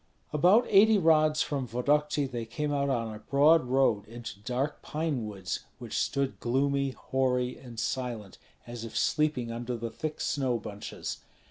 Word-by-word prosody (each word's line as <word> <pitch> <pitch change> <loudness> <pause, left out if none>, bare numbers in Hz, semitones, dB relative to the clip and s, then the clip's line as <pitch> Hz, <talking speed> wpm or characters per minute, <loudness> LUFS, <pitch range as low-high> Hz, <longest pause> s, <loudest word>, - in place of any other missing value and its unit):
About 185 +11 +5
eighty 210 +2 +6
rods 155 -3 +4
from 135 -3 -3
Vodokty 145 +5 +1
they 120 -3 -4
came 145 +6 -3
out 140 0 +1
on 115 -4 -1
a 105 - -8
broad 145 +6 +4
road 125 -5 +2
into 115 -3 -8
dark 125 +7 -2
pine 150 -7 -2
woods 95 -3 -4 0.2
which - - -7
stood 140 -1 -1
gloomy, 140 +3 +1
hoary, 130 -1 -1
and 120 -3 -9
silent 115 -4 -3 0.3
as 120 -1 -7
if 115 0 -6
sleeping 150 -6 +1
under 120 +1 -4
the 115 0 -5
thick 155 -1 -5
snow 130 -5 0
bunches. 105 -2 -6
130 Hz, 155 wpm, -29 LUFS, 115-150 Hz, 0.3 s, eighty